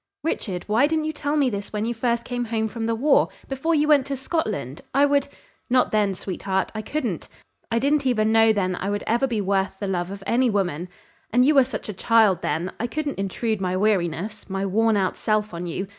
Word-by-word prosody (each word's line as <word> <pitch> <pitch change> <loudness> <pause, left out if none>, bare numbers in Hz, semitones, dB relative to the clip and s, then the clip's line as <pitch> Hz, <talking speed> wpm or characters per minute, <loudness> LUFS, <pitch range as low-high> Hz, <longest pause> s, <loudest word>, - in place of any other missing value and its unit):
"Richard, 195 - -2
why 225 +7 +3
didn't 315 0 0
you 310 - -2
tell 295 0 -1
me 275 -4 +2
this 200 -1 -5
when 210 0 -2
you 235 - -1
first 235 0 0
came 245 -1 -3
home 220 -1 -1
from 225 +1 -4
the 230 - +1
war 275 +5 +3 0.2
before 275 +5 0
you 300 0 +2
went 285 -3 +4
to 275 -1 -3
Scotland? 215 - -3
I 280 +1 +6
would 285 0 +2 0.2
" - - -38
"Not 250 0 +3
then, 205 -3 +1
sweetheart; 190 +1 -2
I 215 - -3
couldn't. 230 - -3 0.4
I 230 - 0
didn't 280 +2 +2
even 220 -3 +2
know 225 0 +5
then 185 -4 0
I 190 +2 -3
would 205 0 -2
ever 240 +4 +1
be 225 -4 -1
worth 195 0 0
the 205 - -3
love 180 -2 -1
of 200 0 -8
any 245 +3 +2
woman; 180 -5 -1 0.4
and 250 +2 +4
you 300 - +5
were 275 -2 +6
such 265 - -6
a 210 - -4
child 210 -2 +3
then 175 +3 -2
I 235 - -1
couldn't 295 -1 -3
intrude 200 +2 -2
my 185 0 0
weariness 200 0 -1
my 195 +1 -2
worn 220 +3 +2
out 190 -2 0
self 215 -2 0
on 170 +1 -5
you. 185 +3 -3
220 Hz, 230 wpm, -24 LUFS, 195-255 Hz, 0.4 s, I